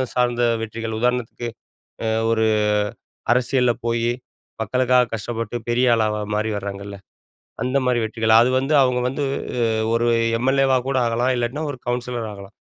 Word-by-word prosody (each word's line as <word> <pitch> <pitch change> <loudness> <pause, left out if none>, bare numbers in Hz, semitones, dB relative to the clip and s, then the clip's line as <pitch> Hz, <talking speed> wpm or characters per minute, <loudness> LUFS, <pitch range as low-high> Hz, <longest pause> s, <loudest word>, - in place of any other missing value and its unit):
சார்ந்த 120 -1 +1 0.2
வெற்றிகள், 115 0 -5
உதாரணத்துக்கு 125 -1 -1 0.6
அ - - 0 0.2
ஒரு 110 -1 +2 0.9
அரசியல்ல 125 0 +2
போய் 115 0 +1 0.5
மக்களுக்காகக் 125 +1 +2
கஷ்டப்பட்டுப் 115 +1 -4
பெரிய 125 +2 +2
ஆளா 105 -1 0
மாறி 110 +1 0
வராங்கல்ல. 100 0 -6 0.7
அந்த 130 +2 +1
மாரி 125 -1 +2
வெற்றிகள். 110 0 +1
அது 120 - +3
வந்து 135 +3 -1
அவங்க 125 -1 +2
வந்து, 140 +3 -2 0.7
ஒரு 120 +1 +1 0.3
எம். 125 +3 0
எல். 135 0 +2
ஏ. - - +4
வா 130 - +5
கூட 135 -1 0
ஆகலாம், 120 +3 +1
இல்லாட்டினா 120 +6 -2
ஒரு 130 - -7
கவுன்சிலர் 120 -2 -2
ஆகலாம். 100 -1 -11
120 Hz, 145 wpm, -22 LUFS, 110-125 Hz, 0.9 s, வா